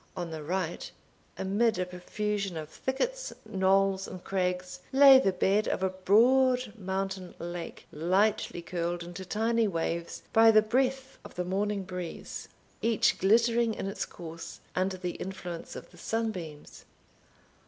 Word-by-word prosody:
On 175 Hz, -2 st, -4 dB
the 160 Hz, -1 st, -5 dB
right, 180 Hz, +5 st, -3 dB, 0.5 s
amid 220 Hz, +4 st, +1 dB
a 180 Hz, -, 0 dB
profusion 195 Hz, +1 st, -3 dB
of 155 Hz, -1 st, -6 dB
thickets, -, -, -3 dB
knolls, 195 Hz, -1 st, +2 dB
and 185 Hz, -1 st, -9 dB
crags, 180 Hz, -1 st, -2 dB
lay 270 Hz, 0 st, +9 dB
the 195 Hz, -7 st, +2 dB
bed 195 Hz, +3 st, +2 dB
of 190 Hz, -, -1 dB
a 190 Hz, -, +1 dB
broad 245 Hz, +5 st, +3 dB
mountain 190 Hz, -2 st, -4 dB
lake, 175 Hz, 0 st, -6 dB
lightly 185 Hz, +2 st, +1 dB
curled 170 Hz, 0 st, -2 dB
into 175 Hz, +2 st, -7 dB
tiny 225 Hz, +3 st, +1 dB
waves 170 Hz, -2 st, -3 dB
by 225 Hz, 0 st, +7 dB
the 215 Hz, -1 st, +6 dB
breath 260 Hz, +4 st, 0 dB
of -, -, -12 dB
the 180 Hz, -, -2 dB
morning 200 Hz, +2 st, -1 dB
breeze, 180 Hz, -2 st, -6 dB, 0.3 s
each 230 Hz, -1 st, +2 dB
glittering 230 Hz, +2 st, +3 dB
in -, -, -4 dB
its 195 Hz, -, -3 dB
course 165 Hz, -1 st, -9 dB, 0.2 s
under 185 Hz, +1 st, 0 dB
the 180 Hz, -1 st, -3 dB
influence 180 Hz, -3 st, -6 dB
of -, -, -9 dB
the -, -, -16 dB
sunbeams. 185 Hz, -10 st, -4 dB
190 Hz, 145 wpm, -29 LUFS, 180-225 Hz, 0.5 s, lay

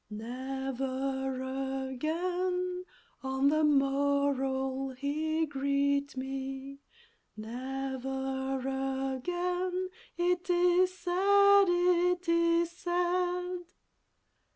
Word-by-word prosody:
Never 265 Hz, +3 st, -3 dB, 0.5 s
again 360 Hz, +5 st, -1 dB, 0.4 s
on 265 Hz, +1 st, +2 dB
the 310 Hz, +1 st, +2 dB
morrow'll 275 Hz, -2 st, +1 dB
he 315 Hz, +3 st, 0 dB
greet 280 Hz, -1 st, 0 dB
me, 270 Hz, +1 st, -5 dB, 0.6 s
Never 265 Hz, +3 st, -3 dB, 0.6 s
again, 360 Hz, +5 st, -2 dB, 0.3 s
it 355 Hz, +1 st, 0 dB
is 355 Hz, +1 st, +4 dB
said, 400 Hz, +2 st, +5 dB
it 355 Hz, 0 st, +2 dB
is 335 Hz, 0 st, +3 dB
said! 360 Hz, +1 st, -1 dB
285 Hz, 65 wpm, -30 LUFS, 270-355 Hz, 0.6 s, said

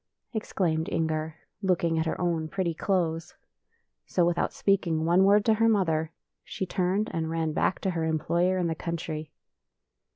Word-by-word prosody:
exclaimed 170 Hz, -7 st, -1 dB
Inger, 160 Hz, -1 st, -1 dB, 0.3 s
looking 170 Hz, -4 st, +1 dB
at 160 Hz, -, 0 dB
her -, -, -2 dB
own 170 Hz, -3 st, 0 dB
pretty 180 Hz, -1 st, -1 dB
clothes. 165 Hz, -2 st, -1 dB, 0.7 s
So, 175 Hz, -, +2 dB
with 175 Hz, 0 st, +2 dB
out -, -, 0 dB
speaking 170 Hz, -5 st, +1 dB
one 175 Hz, +3 st, +4 dB
word 205 Hz, +1 st, +5 dB
to 225 Hz, -, +5 dB
her 225 Hz, +1 st, +3 dB
mother, 165 Hz, -7 st, +1 dB, 0.3 s
she 190 Hz, -, -4 dB
turned 190 Hz, +3 st, 0 dB
and 160 Hz, -1 st, -1 dB
ran 160 Hz, -1 st, -1 dB
back 185 Hz, -, +1 dB
to 190 Hz, -, 0 dB
her 165 Hz, -2 st, -2 dB
employer 170 Hz, +3 st, +1 dB
in 180 Hz, -, 0 dB
the 165 Hz, -, 0 dB
country. 160 Hz, -2 st, -5 dB
170 Hz, 165 wpm, -27 LUFS, 160-190 Hz, 0.7 s, word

